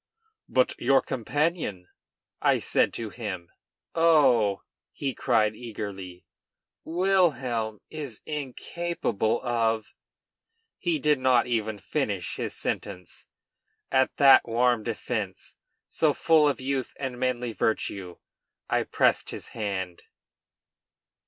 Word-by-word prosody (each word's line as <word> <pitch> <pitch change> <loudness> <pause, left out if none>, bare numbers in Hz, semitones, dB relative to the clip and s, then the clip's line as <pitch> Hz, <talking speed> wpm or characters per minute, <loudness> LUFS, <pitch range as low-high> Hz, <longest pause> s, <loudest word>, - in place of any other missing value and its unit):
"But 130 -1 +3
your 135 +2 +4
companion?" 130 - -1 0.5
I - - +4
said - - +2
to 110 -3 -5
him. 95 -7 -6 0.4
"Oh!" 135 -12 +4 0.3
he 135 -2 -3
cried 110 -2 +2
eagerly. 100 -6 -7 0.6
"Wilhelm 140 - +1
is 145 -8 -6
incapable 145 -5 -2
of 115 -3 0 0.4
" 455 0 -50
He 175 -3 0
did 150 -1 +2
not 130 -2 +4
even 110 -3 -1
finish 100 - -2
his - - -3
sentence. 90 -3 -5 0.6
At 130 0 +2
that 135 -3 +7
warm 120 0 +2
defence, - - -4 0.3
so - - +1
full 155 -2 +4
of 140 - 0
youth 130 -1 -2
and 130 -3 -4
manly 125 -2 -1
virtue, 95 -5 -2 0.5
I - - +1
pressed - - +2
his - - -6
hand. 95 -5 -4
120 Hz, 105 wpm, -27 LUFS, 105-145 Hz, 0.6 s, that